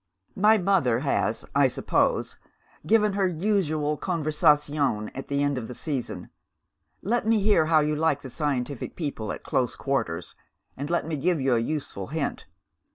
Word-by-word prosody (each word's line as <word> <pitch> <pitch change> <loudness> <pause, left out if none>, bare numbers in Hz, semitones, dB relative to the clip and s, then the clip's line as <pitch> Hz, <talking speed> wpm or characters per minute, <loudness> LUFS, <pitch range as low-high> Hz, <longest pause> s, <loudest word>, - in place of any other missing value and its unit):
"My 215 +3 +5
mother 175 - +2
has, 140 - 0
I - - +5
suppose, - - 0 0.5
given 210 0 +4
her 195 -1 +2
usual 155 -5 0
conversazione 150 - +1
at 135 - -7
the 140 0 0
end 145 -2 0
of 115 - -7
the 125 - -8
season. 140 -3 -4 0.7
Let 225 +3 0
me 225 -1 +4
hear 200 -6 +3
how 160 -1 +5
you 150 0 0
like 150 -2 +1
the 130 - -8
scientific 140 -3 -3
people 140 -10 -4
at - - -7
close 125 -2 0
quarters, 135 -12 -2 0.4
and 140 +3 -5
let 170 -2 0
me 160 -1 -3
give 170 +3 +1
you 135 -1 +2
a 115 - +3
useful 115 -6 -4
hint. 150 -1 -3
150 Hz, 160 wpm, -26 LUFS, 135-175 Hz, 0.7 s, My